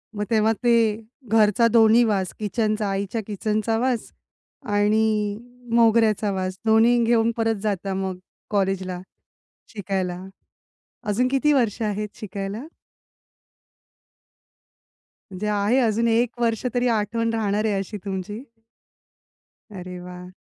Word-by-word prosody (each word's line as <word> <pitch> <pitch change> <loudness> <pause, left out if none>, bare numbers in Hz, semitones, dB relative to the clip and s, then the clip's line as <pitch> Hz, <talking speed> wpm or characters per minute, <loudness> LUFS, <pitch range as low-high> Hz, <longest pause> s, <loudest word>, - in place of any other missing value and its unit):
मग 210 - -2
तेव्हा 220 -1 +3
ते 240 - +3 0.6
घरचा 220 +1 +4
दोन्ही 230 +1 +6
वास 195 -5 0
किचनचा, 215 0 -1
आईच्या 200 +3 -2
किचनचा 215 +2 -1
वास 250 -2 -1 0.5
आणि 210 0 +1 0.4
मोगऱ्याचा 225 -3 +3
वास 185 -1 -3
दोन्ही 225 +2 +5
घेऊन 230 0 +3
परत 225 -1 +1
जाता 195 -2 -2
मग 190 -1 -3 0.3
कॉलेजला 190 -2 -1 0.7
शिकायला? 185 -3 -3 0.9
अजून 240 +5 +1
किती 275 +3 +2
वर्ष 230 -4 +1
आहेत 210 -1 -2
शिकायला? 200 +1 -5 2.7
म्हणजे 195 +3 -4
आहे 210 +5 +2
अजून 230 -1 +1
1 240 +1 +1
वर्ष 230 +1 0
तरी 245 0 +1
आठवण 230 +1 0
राहणार 215 -1 0
आहे 210 - +1
अशी 205 +2 -5
तुमची. 195 +3 -5 1.4
अरे 180 0 -7
वाह! 180 0 -10
215 Hz, 110 wpm, -23 LUFS, 195-225 Hz, 2.7 s, दोन्ही